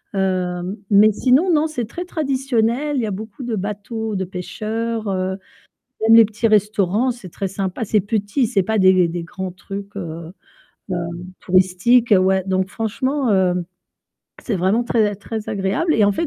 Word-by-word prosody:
Heu, 185 Hz, 0 st, -1 dB
mais 210 Hz, +1 st, +6 dB
sinon, 265 Hz, -, +3 dB
non, 310 Hz, -1 st, +3 dB
c'est 310 Hz, -6 st, -3 dB
très 345 Hz, +11 st, -6 dB
traditionnel, 270 Hz, -3 st, 0 dB
il -, -, +1 dB
y -, -, 0 dB
a -, -, -3 dB
beaucoup 215 Hz, +6 st, -7 dB
de 240 Hz, -2 st, -2 dB
bateaux 210 Hz, +2 st, -4 dB
de 190 Hz, -, -1 dB
pêcheurs, 220 Hz, +5 st, -4 dB
heu, 190 Hz, 0 st, -1 dB, 0.7 s
même 225 Hz, +1 st, +6 dB
les 230 Hz, -, +9 dB
petits 215 Hz, +2 st, -1 dB
restaurants, 210 Hz, +2 st, +2 dB
c'est 235 Hz, -6 st, -7 dB
très 195 Hz, +3 st, -4 dB
sympa, 195 Hz, +2 st, -3 dB
c'est 215 Hz, 0 st, +2 dB
petit, 205 Hz, +5 st, 0 dB
c'est 215 Hz, -4 st, +1 dB
pas 220 Hz, +4 st, -1 dB
des 185 Hz, -2 st, +5 dB
des 170 Hz, +1 st, -4 dB
grands 185 Hz, +2 st, -6 dB
trucs, 200 Hz, +2 st, -8 dB
heu, 165 Hz, -2 st, -6 dB, 0.6 s
heu, -, -, 0 dB, 0.4 s
touristiques, 190 Hz, +6 st, +3 dB
ouais. 190 Hz, 0 st, +2 dB
Donc 190 Hz, 0 st, 0 dB
franchement, 250 Hz, +4 st, -1 dB
heu, 190 Hz, -2 st, +3 dB, 0.9 s
c'est 220 Hz, -, -2 dB
vraiment 190 Hz, +7 st, +1 dB
très 225 Hz, -2 st, +2 dB
a 205 Hz, -, -5 dB
très 215 Hz, +2 st, -6 dB
agréable 200 Hz, -, 0 dB
et 215 Hz, -, +4 dB
en 200 Hz, -, +3 dB
fait, 330 Hz, +12 st, -1 dB
210 Hz, 175 wpm, -20 LUFS, 190-230 Hz, 0.9 s, les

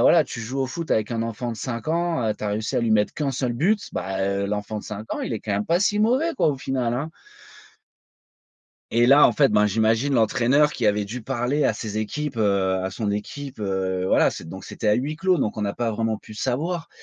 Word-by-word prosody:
voilà, 170 Hz, -, +6 dB
tu 115 Hz, -, -7 dB
joues 125 Hz, +4 st, -4 dB
au 130 Hz, -, +1 dB
foot 165 Hz, +5 st, -6 dB
avec 110 Hz, +1 st, +1 dB
un 115 Hz, -1 st, -1 dB
enfant 115 Hz, +1 st, -4 dB
de -, -, -8 dB
5 115 Hz, +1 st, -5 dB
ans, 170 Hz, -4 st, 0 dB
heu, 105 Hz, -, 0 dB
tu -, -, -5 dB
as 105 Hz, -, 0 dB
réussi 105 Hz, +1 st, -2 dB
à -, -, +3 dB
lui 115 Hz, -1 st, 0 dB
mettre 105 Hz, -1 st, +2 dB
qu'1 145 Hz, -2 st, -1 dB
seul 125 Hz, -2 st, -1 dB
but, 195 Hz, -, +2 dB
ben, 95 Hz, 0 st, -3 dB
heu, 100 Hz, +1 st, 0 dB
l'enfant 105 Hz, +1 st, -3 dB
de -, -, -9 dB
5 105 Hz, +1 st, -6 dB
ans, -, -, -4 dB
il -, -, -3 dB
est, 110 Hz, -, -3 dB
quand 110 Hz, -, -6 dB
même, 100 Hz, +1 st, -1 dB
pas 170 Hz, +2 st, +2 dB
si 205 Hz, +1 st, +2 dB
mauvais 260 Hz, +10 st, +2 dB
quoi, -, -, +2 dB
au 140 Hz, -, 0 dB
final, 130 Hz, -3 st, -1 dB
hein! 145 Hz, +6 st, -3 dB, 1.8 s
Et 120 Hz, +1 st, +4 dB
là, 140 Hz, +3 st, +7 dB
en -, -, +7 dB
fait, 140 Hz, -4 st, +3 dB
ben, 105 Hz, 0 st, +4 dB
j'imagine 110 Hz, +6 st, +2 dB
l'entraîneur 125 Hz, +6 st, +3 dB
qui 120 Hz, -, -3 dB
avait 105 Hz, 0 st, +2 dB
dû 115 Hz, +4 st, -6 dB
parler 135 Hz, +4 st, -1 dB
à -, -, +3 dB
ses 105 Hz, -2 st, -5 dB
équipes, 135 Hz, +5 st, -3 dB
heu, 100 Hz, -3 st, +2 dB
à 95 Hz, -, -2 dB
son 100 Hz, +1 st, -2 dB
équipe, 130 Hz, +4 st, -6 dB
heu, 95 Hz, -2 st, -1 dB
voilà, -, -, +4 dB
c'est 80 Hz, -, -8 dB
donc 95 Hz, +1 st, -8 dB
c'était 110 Hz, -, -3 dB
à 105 Hz, -, +5 dB
huis-clos 155 Hz, -, 0 dB
donc 110 Hz, -, -1 dB
on 105 Hz, -, -2 dB
n'a 100 Hz, -1 st, -1 dB
pas 115 Hz, -2 st, -1 dB
vraiment 110 Hz, 0 st, -1 dB
pu 110 Hz, -, -13 dB
savoir. 160 Hz, +9 st, -2 dB
115 Hz, 245 wpm, -24 LUFS, 105-145 Hz, 1.8 s, là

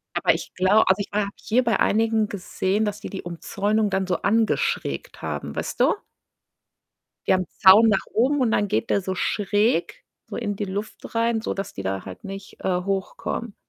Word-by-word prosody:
Aber -, -, +3 dB
ich -, -, -6 dB
glau 190 Hz, +4 st, +4 dB
also, 190 Hz, +2 st, +3 dB
ich -, -, -3 dB
ha 210 Hz, -, +1 dB
habe 200 Hz, -1 st, -2 dB
hier 250 Hz, +3 st, +1 dB
bei 230 Hz, -3 st, +1 dB
einigen 220 Hz, 0 st, +2 dB
gesehen, 200 Hz, +2 st, -1 dB
dass 210 Hz, 0 st, -3 dB
die -, -, -6 dB
die 195 Hz, -, -6 dB
Umzäunung 205 Hz, +5 st, -1 dB
dann 190 Hz, -1 st, 0 dB
so 180 Hz, -2 st, +1 dB
angeschrägt 225 Hz, +2 st, 0 dB
haben, -, -, -4 dB
weißt -, -, -4 dB
du? -, -, +5 dB, 1.3 s
Die -, -, +6 dB
haben 185 Hz, 0 st, +3 dB
'n -, -, -31 dB
Zaun 210 Hz, +4 st, +8 dB
nach 200 Hz, -3 st, +2 dB
oben 265 Hz, +5 st, +2 dB
und 240 Hz, -3 st, +2 dB
dann 205 Hz, -1 st, +1 dB
geht 110 Hz, -, -1 dB
der 200 Hz, -, +3 dB
so 185 Hz, 0 st, -3 dB
schräg 205 Hz, -, 0 dB, 0.2 s
so -, -, -6 dB
in 205 Hz, -4 st, -2 dB
die 205 Hz, -, -2 dB
Luft 205 Hz, +4 st, -6 dB
rein, 230 Hz, 0 st, +1 dB
sodass 195 Hz, -2 st, -4 dB
die 95 Hz, -, -5 dB
da 95 Hz, 0 st, -3 dB
halt 95 Hz, -1 st, -10 dB
nicht, 195 Hz, 0 st, -8 dB
äh, 180 Hz, -1 st, 0 dB
hochkommen. 195 Hz, +3 st, -3 dB
205 Hz, 195 wpm, -24 LUFS, 190-220 Hz, 1.3 s, Zaun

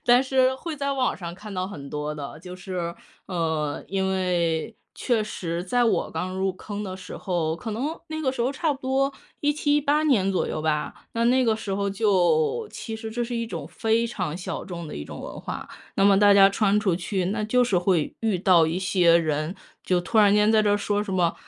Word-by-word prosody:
但 245 Hz, +1 st, +6 dB
是 260 Hz, -1 st, +2 dB
会 310 Hz, +4 st, -6 dB
在 280 Hz, -1 st, -1 dB
网 260 Hz, -2 st, 0 dB
上 170 Hz, -2 st, -6 dB
看 210 Hz, +2 st, -10 dB
到 185 Hz, -1 st, -2 dB
很 145 Hz, -8 st, -8 dB
多 150 Hz, +1 st, -3 dB
的。 150 Hz, 0 st, -7 dB
就 180 Hz, +1 st, -9 dB
是 180 Hz, -2 st, -4 dB, 0.3 s
呃， 160 Hz, -5 st, -2 dB
因 190 Hz, 0 st, 0 dB
为 175 Hz, -1 st, 0 dB, 0.2 s
确 235 Hz, -4 st, 0 dB
实 170 Hz, -4 st, -4 dB
在 245 Hz, +6 st, +2 dB
我 225 Hz, -, +1 dB
刚 185 Hz, +3 st, -3 dB
入 190 Hz, 0 st, 0 dB
坑 205 Hz, +2 st, -6 dB
的 185 Hz, -1 st, -5 dB
时 190 Hz, -1 st, -9 dB
候， 170 Hz, -4 st, -1 dB
可 220 Hz, -, -6 dB
能 280 Hz, +9 st, -3 dB
那 315 Hz, 0 st, -4 dB
个 275 Hz, -4 st, +1 dB
时 260 Hz, -, -5 dB
候 245 Hz, +3 st, +2 dB
差 305 Hz, +2 st, 0 dB
不 275 Hz, -, -9 dB
多 270 Hz, +1 st, +1 dB, 0.3 s
17，18 295 Hz, 0 st, +2 dB
年 215 Hz, -11 st, +3 dB
左 185 Hz, -, 0 dB
右 155 Hz, -, -3 dB
吧， 155 Hz, -1 st, -2 dB
那 230 Hz, 0 st, 0 dB
那 255 Hz, +1 st, +4 dB
个 225 Hz, -2 st, +3 dB
时 200 Hz, -3 st, -4 dB
候 200 Hz, 0 st, -1 dB
就 190 Hz, -, +2 dB
其 225 Hz, -, -6 dB
实 220 Hz, 0 st, -6 dB
这 240 Hz, +2 st, -2 dB
是 240 Hz, +1 st, -5 dB
一 230 Hz, 0 st, -2 dB
种 -, -, -6 dB
非 225 Hz, +1 st, +1 dB
常 180 Hz, -9 st, -3 dB
小 180 Hz, -, -5 dB
众 170 Hz, -3 st, -6 dB
的 -, -, -7 dB
一 75 Hz, -, -5 dB
种 -, -, -9 dB
文 -, -, -7 dB
化。 -, -, -6 dB, 0.3 s
那 195 Hz, -, +3 dB
么 200 Hz, -1 st, +6 dB
大 205 Hz, 0 st, +6 dB
家 195 Hz, -1 st, +8 dB
穿 200 Hz, 0 st, +2 dB
出 195 Hz, -5 st, +1 dB
去， 185 Hz, +1 st, -2 dB
那 210 Hz, +3 st, -1 dB
就 250 Hz, +4 st, +3 dB
是 205 Hz, -6 st, +1 dB
会 175 Hz, -4 st, +1 dB
遇 220 Hz, -5 st, 0 dB
到 180 Hz, -3 st, +5 dB
一 165 Hz, +3 st, -1 dB
些 180 Hz, -2 st, +4 dB
人， 155 Hz, 0 st, -1 dB, 0.3 s
就 180 Hz, -1 st, +1 dB
突 200 Hz, +6 st, -4 dB
然 205 Hz, -2 st, +6 dB
间 210 Hz, +1 st, +4 dB
在 215 Hz, -, +5 dB
这 205 Hz, -, +2 dB
儿 -, -, +3 dB
说 205 Hz, 0 st, 0 dB
什 200 Hz, -, -5 dB
么： 175 Hz, -3 st, +2 dB
195 Hz, 240 characters per minute, -25 LUFS, 175-230 Hz, 0.3 s, 家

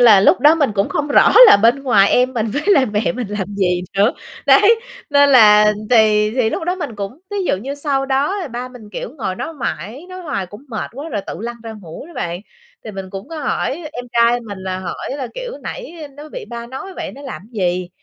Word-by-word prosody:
là 220 Hz, -5 st, +7 dB
lúc 205 Hz, -, +4 dB
đó 300 Hz, +2 st, +6 dB
mình 285 Hz, -7 st, +1 dB
cũng 195 Hz, +1 st, +1 dB
không 295 Hz, 0 st, -2 dB
rõ -, -, +5 dB
là -, -, +8 dB
bên 235 Hz, +6 st, +3 dB
ngoài 205 Hz, -7 st, +4 dB
em 250 Hz, +1 st, +3 dB
mình 225 Hz, -1 st, 0 dB
với 285 Hz, +8 st, -3 dB
lại 320 Hz, -11 st, +4 dB
mẹ 210 Hz, +3 st, -1 dB
mình 245 Hz, -3 st, -4 dB
làm 205 Hz, -1 st, -4 dB
gì 180 Hz, -2 st, 0 dB, 0.2 s
nữa, 210 Hz, +6 st, +4 dB, 0.3 s
đấy, 450 Hz, +3 st, +5 dB, 0.3 s
nên 285 Hz, 0 st, +5 dB
là 210 Hz, -4 st, +7 dB, 0.2 s
thì 215 Hz, -2 st, +4 dB
thì 240 Hz, -4 st, +1 dB
lúc 325 Hz, -, -3 dB
đó 360 Hz, +1 st, 0 dB
mình 290 Hz, -, -5 dB
cũng 200 Hz, +8 st, -6 dB
thí 410 Hz, -, -4 dB
dụ -, -, +1 dB
như 270 Hz, +8 st, -5 dB
sau 280 Hz, -2 st, -1 dB
đó 290 Hz, +6 st, -1 dB
ba 250 Hz, +1 st, -5 dB
mình, 230 Hz, -5 st, -13 dB
kiểu, -, -, -6 dB
ngồi 190 Hz, -5 st, -2 dB
đó 325 Hz, -, -5 dB
mãi, 250 Hz, -, -5 dB
nói 370 Hz, 0 st, -8 dB
hoài 195 Hz, -, -3 dB
cũng 205 Hz, +9 st, -13 dB
mệt 220 Hz, -3 st, -5 dB
quá 285 Hz, +6 st, -7 dB
rồi 210 Hz, -7 st, -3 dB
tự -, -, -5 dB
lăn 235 Hz, +1 st, -5 dB
ra 225 Hz, -1 st, -7 dB
ngủ 170 Hz, -, -10 dB
đó 345 Hz, -, -14 dB
bạn. 175 Hz, +1 st, -4 dB, 0.4 s
Thì 220 Hz, -, -6 dB
mình 190 Hz, -1 st, -8 dB
cũng 195 Hz, 0 st, -8 dB
có 325 Hz, -1 st, -7 dB
hỏi 290 Hz, +3 st, -2 dB
em 245 Hz, -, -6 dB
trai 235 Hz, +1 st, +3 dB
mình 205 Hz, -4 st, -8 dB
là 185 Hz, 0 st, -4 dB
hỏi 185 Hz, +6 st, -6 dB
là, 260 Hz, -3 st, -4 dB
kiểu, -, -, -6 dB
nãy -, -, -7 dB, 0.2 s
nó 300 Hz, +1 st, -10 dB
bị 485 Hz, +6 st, -7 dB
ba 235 Hz, 0 st, -6 dB
nói 370 Hz, +10 st, -8 dB
vậy -, -, -5 dB
nó 280 Hz, -, -12 dB
làm 265 Hz, -8 st, -7 dB
gì, 180 Hz, -3 st, -1 dB
240 Hz, 240 wpm, -18 LUFS, 205-285 Hz, 0.4 s, là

